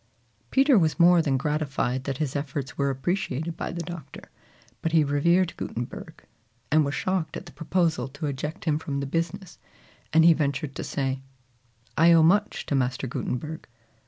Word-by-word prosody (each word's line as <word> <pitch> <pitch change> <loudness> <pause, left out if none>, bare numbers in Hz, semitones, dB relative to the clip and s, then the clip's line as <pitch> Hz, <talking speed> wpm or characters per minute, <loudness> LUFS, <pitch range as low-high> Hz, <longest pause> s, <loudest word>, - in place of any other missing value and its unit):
Peter 270 -4 +5
was 160 0 +1
more 175 0 +7
than 140 -4 +1
gratified 140 -3 -1
that 135 -2 -2
his 150 -2 -2
efforts 140 -1 -4
were 140 0 +1
appreciated 160 +2 -2
by - - -4
the 170 0 -4
Doctor; 160 -4 -9 0.5
but 165 - -2
he 160 -2 +5
revered 170 +5 +2
Gutenberg, 120 +1 -6 0.5
and 155 +1 +5
was 140 0 -2
shocked 185 -5 -1
at - - -9
the 175 - -11
proposal 160 -2 0
to 145 +3 -6
eject 150 +5 -4
him 155 -2 +1
from 140 -3 -3
the 140 - -2
business, 165 +4 -3 0.5
and 160 0 +5
he 170 - +8
ventured 140 -2 -2
to - - -5
say, 135 -1 -2 0.7
"I 170 +1 +6
owe 165 -1 +6
much 205 +6 +2
to - - -3
Master 130 -1 0
Gutenberg." 140 +5 -4
155 Hz, 170 wpm, -26 LUFS, 140-170 Hz, 0.7 s, he